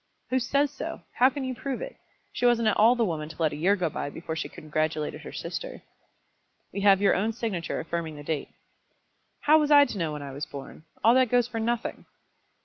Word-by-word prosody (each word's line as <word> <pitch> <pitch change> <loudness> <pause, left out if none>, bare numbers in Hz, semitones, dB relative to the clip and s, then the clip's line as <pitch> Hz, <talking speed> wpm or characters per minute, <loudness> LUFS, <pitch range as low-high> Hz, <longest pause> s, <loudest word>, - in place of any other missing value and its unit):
"Who 260 - +3
says 280 +3 +1
so? 270 - -6
How 255 +2 +5
can 275 0 -5
you 260 0 -2
prove 270 +2 -4
it? - - -6 0.4
She 245 - +2
wasn't 235 -2 +3
at - - +1
all 230 +4 +6
the 235 -2 +2
woman 155 -5 -3
to - - -12
let 160 -2 +1
a - - -4
year 180 +7 +3
go 180 -4 0
by 145 - -4
before 160 +2 -6
she - - -3
congratulated 155 0 -2
her - - -9
sister." - - -6 0.9
"We 200 - -3
have 195 -1 +5
your 200 - +5
own 220 +4 0
signature 215 -7 -3
affirming 165 -1 -4
the 145 - -9
date." 150 -1 -3 0.9
"How 310 +1 +6
was 300 -1 +1
I 290 -1 +8
to 205 - -5
know 160 -3 -1
when 150 -1 -6
I 140 - -7
was 145 +2 -5
born? 140 +3 -10 0.2
All 230 - +7
that 255 -1 +4
goes 245 -1 +3
for 230 -2 -4
nothing." 235 +1 -2
205 Hz, 225 wpm, -27 LUFS, 160-250 Hz, 0.9 s, I